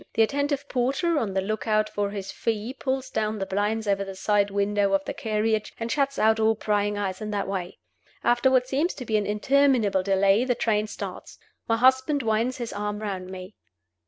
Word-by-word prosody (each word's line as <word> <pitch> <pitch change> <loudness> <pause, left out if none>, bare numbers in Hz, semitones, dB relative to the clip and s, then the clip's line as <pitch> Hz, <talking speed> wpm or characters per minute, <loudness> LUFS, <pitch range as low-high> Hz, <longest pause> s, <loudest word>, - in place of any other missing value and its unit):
The 225 - +5
attentive 285 +3 -1
porter, 275 +7 +1
on 200 -6 -3
the 190 - +2
look 215 +3 -3
out 215 0 +2
for 205 -1 -2
his 200 -1 -6
fee 225 +2 -2
pulls 265 -1 -3
down 215 0 -1
the 195 - -2
blinds 210 +3 -1
over 200 0 +1
the 195 -1 -7
side 205 +1 +1
windows 200 0 +1
of 195 0 -1
the - - -3
carriage, 215 0 -1
and 230 0 -3
shuts 275 0 0
out 220 +1 +3
all 220 0 +3
prying 205 -1 0
eyes 195 -1 -3
in 215 - -4
that 200 -2 -2
way. 185 -2 -4 0.5
After 240 +2 +3
what 255 -1 +3
seems 290 +7 0
to 250 - -7
be 220 - -1
an 205 - -1
interminable 225 -2 +2
delay 195 +3 +3
the 250 -1 0
train 215 -2 0
starts. - - -7 0.3
My 225 - +2
husband 260 +3 +3
winds 225 +3 0
his 240 -2 -5
arm 210 0 -3
round 195 -3 -5
me. 185 +1 -8
215 Hz, 205 wpm, -25 LUFS, 200-250 Hz, 0.5 s, The